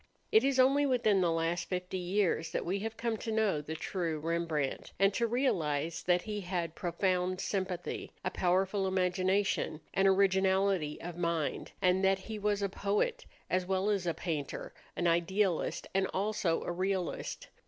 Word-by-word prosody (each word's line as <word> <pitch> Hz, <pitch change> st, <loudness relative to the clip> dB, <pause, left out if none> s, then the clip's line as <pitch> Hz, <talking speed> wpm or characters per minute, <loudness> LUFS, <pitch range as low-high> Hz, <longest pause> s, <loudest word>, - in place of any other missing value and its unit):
It 220 Hz, -, +6 dB
is 270 Hz, -1 st, +2 dB
only 275 Hz, +3 st, +5 dB
within 220 Hz, -7 st, +3 dB
the 175 Hz, -2 st, +2 dB
last 165 Hz, +1 st, -1 dB
fifty 180 Hz, 0 st, -3 dB
years 180 Hz, -3 st, 0 dB
that -, -, -1 dB
we 190 Hz, +3 st, -1 dB
have 225 Hz, +2 st, -4 dB
come 230 Hz, -1 st, -1 dB
to 225 Hz, -, -4 dB
know 215 Hz, -8 st, +1 dB
the 155 Hz, +2 st, -6 dB
true 165 Hz, -1 st, -2 dB
Rembrandt, 160 Hz, -3 st, -2 dB
and 195 Hz, +1 st, +4 dB
to 235 Hz, +2 st, +1 dB
realize 165 Hz, -, 0 dB
that 180 Hz, 0 st, +2 dB
he 210 Hz, -2 st, -4 dB
had 175 Hz, -3 st, -2 dB
profound 180 Hz, +1 st, 0 dB
sympathy, 185 Hz, -3 st, -3 dB
a 185 Hz, -, 0 dB
powerful 190 Hz, +2 st, +1 dB
imagination, 185 Hz, -2 st, +1 dB
and 195 Hz, +1 st, +3 dB
originality 190 Hz, -4 st, +2 dB
of 175 Hz, 0 st, -6 dB
mind, 170 Hz, -3 st, -1 dB
and 185 Hz, +1 st, +3 dB
that 195 Hz, 0 st, +4 dB
he 215 Hz, +3 st, -7 dB
was 205 Hz, -1 st, 0 dB
a -, -, +2 dB
poet 210 Hz, -, -1 dB, 0.2 s
as 185 Hz, 0 st, 0 dB
well 190 Hz, +2 st, +1 dB
as 195 Hz, -4 st, -1 dB
a 165 Hz, -, 0 dB
painter, 155 Hz, -4 st, -4 dB, 0.2 s
an 175 Hz, -, -1 dB
idealist 175 Hz, +2 st, +1 dB
and 190 Hz, 0 st, +2 dB
also 195 Hz, -4 st, 0 dB
a -, -, -3 dB
realist. 185 Hz, 0 st, -2 dB
185 Hz, 165 wpm, -32 LUFS, 170-200 Hz, 0.2 s, It